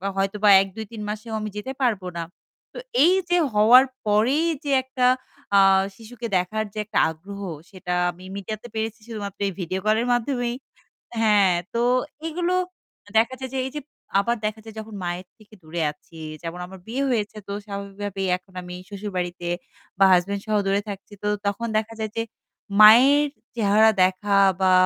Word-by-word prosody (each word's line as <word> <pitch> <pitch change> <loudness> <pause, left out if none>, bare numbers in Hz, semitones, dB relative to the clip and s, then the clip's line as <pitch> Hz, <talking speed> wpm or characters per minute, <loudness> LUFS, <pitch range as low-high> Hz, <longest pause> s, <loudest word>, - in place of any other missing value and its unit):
হয়তোবা 195 +2 +1
১ 195 - -2
২ 220 0 -5
৩ 225 -2 -7
মাসেও 215 +2 -5
আমি 215 0 -4
যেতে 210 +6 -4
পারব 230 -7 +2 0.2
না। 170 - -2 0.5
তো - - -10 0.3
এইযে 355 +1 +3 0.2
হওয়ার 225 +5 +7 0.2
পরেই 230 +10 +3 0.2
যে 290 - -2
একটা 260 -1 -1 0.5
আ - - +8 0.4
শিশুকে 235 +2 -8
দেখার 215 +5 -1
যে - - -12
একটা 215 - 0
আগ্রহ 195 +5 -9 0.3
সেটা 185 -2 -5 0.2
আমি 180 +1 -14
মিডিয়াতে 215 +3 -6
পেরেছি 220 0 -3
শুধুমাত্র 205 -4 -6
এই - - -2
ভিডিও 185 +1 -2
কলের 220 +3 +2
মাধ্যমেই। 245 0 -1 0.6
হ্যাঁ, 205 -4 +4 0.2
তো 235 - 0 0.5
এগুলো 345 +2 -1 0.6
দেখা 230 +3 +3
যায় 260 -1 -5
যে - - -2
এইযে 285 +3 -5 0.4
আবার 235 +4 +1
দেখা 215 +1 -2
যায় 220 -1 -11
যখন 220 -1 -8
মায়ের 175 +1 -4
থেকে 215 0 -20
দূরে 160 +2 -4
আছি। 160 +2 -16 0.2
যেমন 170 +1 -6
আমার 190 +1 -12
বিয়ে 255 +5 -1
হয়েছে 220 -3 -1
তো - - -6
স্বাভাবিকভাবেই 200 -1 -5
এখন 185 +1 -26
আমি 180 0 -8
শশুর 205 0 -6
বাড়িতে 175 -1 -3 0.5
বা 195 - +7
হাসব্যান্ড 195 +3 +1
সহ 215 -1 0
দূরে 200 +1 +2
থাকছি। 200 +1 -8
তো - - 0 0.2
তখন 205 +4 -1
দেখা 220 +1 -2
যায় 220 -1 -3
যে 230 - +1 0.6
মায়ের 265 +7 +8 0.3
চেহারা 215 0 +5
দেখা 190 +2 +1 0.3
বা 190 -1 +4
210 Hz, 165 wpm, -24 LUFS, 195-230 Hz, 0.6 s, আ